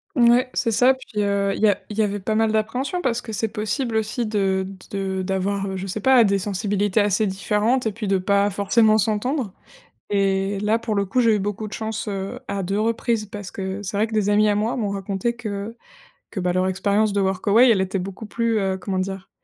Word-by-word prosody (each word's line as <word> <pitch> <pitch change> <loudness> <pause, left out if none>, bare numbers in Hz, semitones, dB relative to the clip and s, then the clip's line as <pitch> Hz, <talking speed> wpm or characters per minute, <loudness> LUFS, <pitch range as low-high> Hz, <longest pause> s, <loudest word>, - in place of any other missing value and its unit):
Mouais, 240 +1 +5
c'est 230 - 0
ça, 250 +4 +5
puis, 230 -5 -4
heu, 200 -1 +1
il - - -6
y - - +7
a 205 - +2
il 210 - -7
y 220 - +4
avait 205 0 -1
pas 215 +3 -2
mal 220 0 +2
d'appréhensions, 250 +10 -1
parce 240 -7 0
que 220 - -8
c'est 225 +2 0
possible 220 +3 -2
aussi 220 +2 -1
de 195 -3 +1 0.3
de 195 -1 -2
de - - -1
d'avoir, 195 +1 -2
je 190 +1 -5
sais 205 +3 -4
pas, 260 +1 +6
des 200 -2 +2
sensibilités 205 +1 0
assez 205 +1 +2
différentes 210 +5 0
et - - 0
puis 215 0 -5
de 195 -1 +2
pas 200 +2 +2
forcément 215 +2 +3
s'entendre. 220 +2 -1 0.6
Et 195 0 0
là, 215 +2 +2
pour 230 -2 -3
le 200 -1 +1
coup 200 +7 0
j'ai 230 -3 +4
eu - - +1
beaucoup 205 +2 -3
de 210 - -11
chance, 220 +1 -4
heu, 195 +4 -4
à 200 -1 -3
2 195 +3 -1
reprises, 225 0 0
parce 205 -1 -8
que 190 +1 -5
c'est 205 +1 -4
vrai 215 +2 +2
que 225 - -12
des 210 -2 +1
amis 210 +1 +4
à 205 - +3
moi 215 +3 0
m'ont 210 -5 -1
raconté 195 +4 -2
que 215 -2 -5 0.6
que, 195 - -4
bah, 180 0 0
leur 185 +1 +1
expérience 200 +3 +1
de 200 - +2
Workaway, 200 +6 +4
elle 210 -4 +3
était 190 +1 -1
beaucoup 195 +4 -7
plus, 230 +1 0
heu, 190 -2 0
comment 190 0 -3
dire 190 0 -4
205 Hz, 230 wpm, -22 LUFS, 195-225 Hz, 0.6 s, y